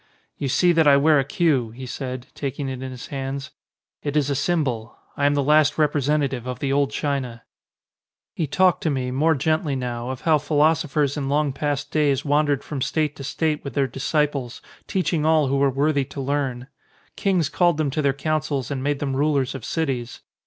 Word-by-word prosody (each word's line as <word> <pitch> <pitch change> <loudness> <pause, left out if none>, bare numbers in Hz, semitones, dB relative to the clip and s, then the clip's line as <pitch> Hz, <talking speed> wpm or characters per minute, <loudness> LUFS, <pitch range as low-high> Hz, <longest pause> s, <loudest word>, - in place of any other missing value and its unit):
"You 140 - -3
see 175 +7 +4
that 165 -2 +3
I 140 -1 +7
wear 150 +1 +4
a - - +2
queue," 140 -5 +1
he 125 +4 -9
said, 130 -1 -5
taking 140 0 -4
it 130 -1 -5
in 130 - -5
his 125 -2 -8
hands. 135 0 -4 0.5
"It 145 0 -2
is 145 -1 +1
a - - 0
symbol. 135 -7 -1 0.2
I 145 - +2
am 145 - +2
the 140 - +1
last 150 +1 +4
representative 145 -4 +1
of 125 -1 -3
the 135 +1 -1
old 140 -1 +2
China." 135 -6 -3 0.9
He 160 - -2
talked 185 +5 +3
to 160 - 0
me, 130 -3 -1
more 155 +5 +2
gently 155 +1 0
now, 120 -1 -4
of 130 -1 -5
how 155 -2 +3
phi 150 +1 -4
losophers 150 -2 +2
in 135 -2 -2
long 145 -1 +1
past 145 0 -2
days 145 -3 +1
wandered 145 -1 +2
from 145 -3 -5
state 155 +1 0
to 140 - -7
state 150 +2 -1
with 140 -4 -7
their 140 - +2
disciples, 140 -2 -1 0.3
teaching 175 -4 0
all 155 -3 +3
who 140 - +1
were 140 0 +3
worthy 140 +2 +1
to 140 - -9
learn. 135 -2 -2 0.5
Kings 185 -6 +1
called 175 +1 +2
them 150 -3 0
to 155 - -1
their 140 -2 +3
coun 155 +3 -1
cils 140 -4 -3
and 135 -2 -2
made 145 +1 0
them 135 -1 -2
rulers 140 -2 +1
of 135 -4 -7
cities. 130 -7 -3
140 Hz, 205 wpm, -23 LUFS, 135-150 Hz, 0.9 s, I